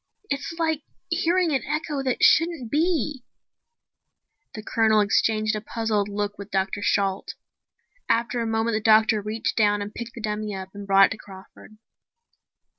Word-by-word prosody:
It's 280 Hz, +3 st, -3 dB
like 320 Hz, -2 st, 0 dB, 0.3 s
hearing 345 Hz, 0 st, +2 dB
an 270 Hz, -4 st, 0 dB
echo 300 Hz, -1 st, -3 dB
that 260 Hz, -2 st, -1 dB
shouldn't 325 Hz, -8 st, +3 dB
be." 300 Hz, -4 st, 0 dB, 1.3 s
The 215 Hz, -, -7 dB
Colonel 220 Hz, -1 st, +2 dB
exchanged 215 Hz, +1 st, +2 dB
a 215 Hz, -, -3 dB
puzzled 215 Hz, -2 st, -1 dB
look 205 Hz, 0 st, -3 dB
with 200 Hz, 0 st, -8 dB
Dr. 195 Hz, +1 st, -1 dB
Shalt. 195 Hz, -2 st, 0 dB, 0.7 s
After 235 Hz, +1 st, +1 dB
a 230 Hz, -, -2 dB
moment 225 Hz, +1 st, 0 dB
the 215 Hz, -, 0 dB
doctor 220 Hz, 0 st, +4 dB
reached 220 Hz, +5 st, -3 dB
down 205 Hz, -2 st, +3 dB
and 205 Hz, +1 st, -6 dB
picked 235 Hz, 0 st, -7 dB
the 235 Hz, -, -8 dB
dummy 210 Hz, -1 st, -3 dB
up 190 Hz, 0 st, -7 dB
and 200 Hz, 0 st, -9 dB
brought 195 Hz, 0 st, +7 dB
it -, -, -1 dB
to 225 Hz, -, -4 dB
Crawford. 195 Hz, +2 st, -14 dB
220 Hz, 160 wpm, -24 LUFS, 205-260 Hz, 1.3 s, brought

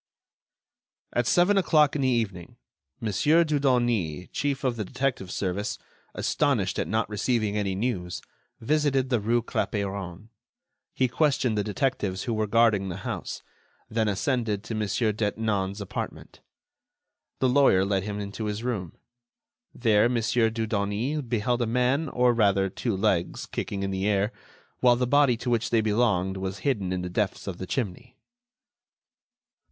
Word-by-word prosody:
At 120 Hz, -1 st, +1 dB
seven 195 Hz, +3 st, +4 dB
o'clock 150 Hz, -5 st, +3 dB
in 145 Hz, -, 0 dB
the 130 Hz, -, +2 dB
evening, 105 Hz, -9 st, -1 dB, 0.4 s
Mon. 110 Hz, -, -2 dB
Dudonis, 125 Hz, -, +2 dB
chief 140 Hz, -1 st, -2 dB
of 130 Hz, -3 st, +1 dB
the 110 Hz, -, -3 dB
detective 125 Hz, -3 st, -2 dB
service, 100 Hz, +3 st, -2 dB, 0.4 s
astonished -, -, 0 dB
at -, -, -1 dB
not 110 Hz, +1 st, 0 dB
receiving 110 Hz, 0 st, 0 dB
any 100 Hz, -2 st, -1 dB
news, 95 Hz, -5 st, -3 dB, 0.4 s
visited 135 Hz, 0 st, +1 dB
the 120 Hz, -, +3 dB
rue 115 Hz, +3 st, +1 dB
Clapeyron. 100 Hz, -3 st, -3 dB, 0.7 s
He 130 Hz, -, +2 dB
questioned 130 Hz, -3 st, +1 dB
the 105 Hz, -, 0 dB
detectives 105 Hz, -4 st, -1 dB
who 120 Hz, -, -2 dB
were 110 Hz, -1 st, 0 dB
guarding 105 Hz, -3 st, +3 dB
the 90 Hz, -, -7 dB
house, -, -, -4 dB, 0.5 s
then 110 Hz, -1 st, +1 dB
ascended 105 Hz, 0 st, 0 dB
to 115 Hz, -, -6 dB
Mon. 110 Hz, -1 st, -1 dB
Detinan's 105 Hz, -2 st, -1 dB
apartment. 100 Hz, -, -6 dB, 1.0 s
The 130 Hz, -, +3 dB
lawyer 125 Hz, -8 st, +4 dB
led 100 Hz, -1 st, +1 dB
him 105 Hz, +1 st, -4 dB
into 100 Hz, +2 st, -5 dB
his 105 Hz, +2 st, -3 dB
room. 105 Hz, -9 st, -3 dB, 0.8 s
There, 110 Hz, -1 st, +3 dB
Mon. 120 Hz, -1 st, +1 dB
Dudonis 110 Hz, +3 st, 0 dB
beheld 120 Hz, +1 st, 0 dB
a 120 Hz, -, +1 dB
man, 125 Hz, +6 st, +1 dB
or 125 Hz, -1 st, +3 dB
rather 100 Hz, -4 st, +2 dB
two 110 Hz, 0 st, -2 dB
legs 95 Hz, -4 st, 0 dB
kicking 100 Hz, -1 st, -4 dB
in 95 Hz, -, -2 dB
the 95 Hz, +1 st, -1 dB
air, 105 Hz, +1 st, +1 dB, 0.5 s
while 125 Hz, -1 st, +5 dB
the 125 Hz, +1 st, 0 dB
body 140 Hz, -2 st, +4 dB
to 125 Hz, +2 st, -3 dB
which 120 Hz, 0 st, +1 dB
they 115 Hz, -2 st, +3 dB
belonged 105 Hz, -4 st, +1 dB
was 95 Hz, +1 st, -4 dB
hidden 105 Hz, -10 st, 0 dB
in 90 Hz, -1 st, -2 dB
the -, -, -3 dB
depths 100 Hz, +3 st, -2 dB
of 95 Hz, -3 st, -5 dB
the 95 Hz, -, -5 dB
chimney. 125 Hz, +3 st, -4 dB
110 Hz, 150 wpm, -26 LUFS, 100-125 Hz, 1.0 s, while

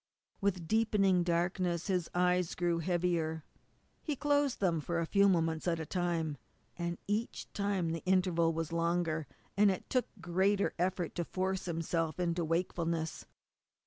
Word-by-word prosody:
With 185 Hz, -4 st, -1 dB
deepening 210 Hz, -4 st, +3 dB
darkness, 175 Hz, 0 st, 0 dB
his 180 Hz, -4 st, 0 dB
eyes 180 Hz, -1 st, +2 dB
grew 175 Hz, -1 st, +1 dB
heavier. 170 Hz, -2 st, 0 dB, 0.6 s
He 300 Hz, -, -2 dB
closed 290 Hz, -1 st, +1 dB
them 170 Hz, -5 st, +1 dB
for 170 Hz, +3 st, -2 dB
a 170 Hz, -, 0 dB
few 200 Hz, +3 st, +4 dB
moments 165 Hz, -2 st, +1 dB
at 165 Hz, -1 st, +1 dB
a 160 Hz, -, -3 dB
time; 165 Hz, -4 st, -1 dB, 0.4 s
and 170 Hz, 0 st, -3 dB
each 210 Hz, +3 st, -2 dB
time 200 Hz, -5 st, 0 dB
the 165 Hz, -, -4 dB
interval 180 Hz, -3 st, +3 dB
was 165 Hz, 0 st, -3 dB
longer, 170 Hz, -2 st, 0 dB, 0.3 s
and 205 Hz, 0 st, +5 dB
it 190 Hz, -, -3 dB
took 255 Hz, -1 st, +2 dB
greater 190 Hz, +4 st, +1 dB
effort 180 Hz, 0 st, 0 dB
to 175 Hz, -, +1 dB
force 190 Hz, +2 st, -2 dB
himself 165 Hz, -1 st, -1 dB
into 170 Hz, -1 st, 0 dB
wakefulness. 165 Hz, -1 st, -1 dB
175 Hz, 145 wpm, -33 LUFS, 165-190 Hz, 0.6 s, and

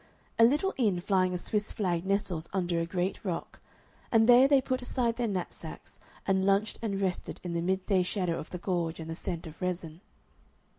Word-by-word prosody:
A -, -, +8 dB
little 300 Hz, +11 st, +4 dB
inn 210 Hz, -8 st, +2 dB
flying 185 Hz, 0 st, +2 dB
a 180 Hz, -, -1 dB
Swiss 210 Hz, +4 st, -2 dB
flag 180 Hz, -3 st, -1 dB
nestles 190 Hz, -5 st, -1 dB
under 175 Hz, -3 st, 0 dB
a 165 Hz, -, -1 dB
great 180 Hz, +2 st, -2 dB
rock, 180 Hz, -5 st, -4 dB, 0.5 s
and 225 Hz, -1 st, +5 dB
there 250 Hz, +2 st, +8 dB
they 280 Hz, -1 st, +5 dB
put 255 Hz, -1 st, -1 dB
aside 245 Hz, -2 st, 0 dB
their 240 Hz, -1 st, -1 dB
knapsacks 185 Hz, -4 st, -6 dB, 0.3 s
and 190 Hz, -1 st, +2 dB
lunched 200 Hz, +2 st, +2 dB
and 200 Hz, -4 st, -2 dB
rested 190 Hz, -2 st, -2 dB
in 175 Hz, -1 st, -4 dB
the 170 Hz, -, 0 dB
mid 190 Hz, +2 st, 0 dB
day 195 Hz, -3 st, +3 dB
shadow 180 Hz, -2 st, -1 dB
of 155 Hz, -, -8 dB
the 180 Hz, -, -5 dB
gorge 170 Hz, -2 st, -2 dB
and 160 Hz, 0 st, -6 dB
the -, -, -4 dB
scent 170 Hz, 0 st, -4 dB
of 160 Hz, +2 st, -11 dB
resin. 175 Hz, -2 st, -3 dB
190 Hz, 200 wpm, -30 LUFS, 175-215 Hz, 0.5 s, A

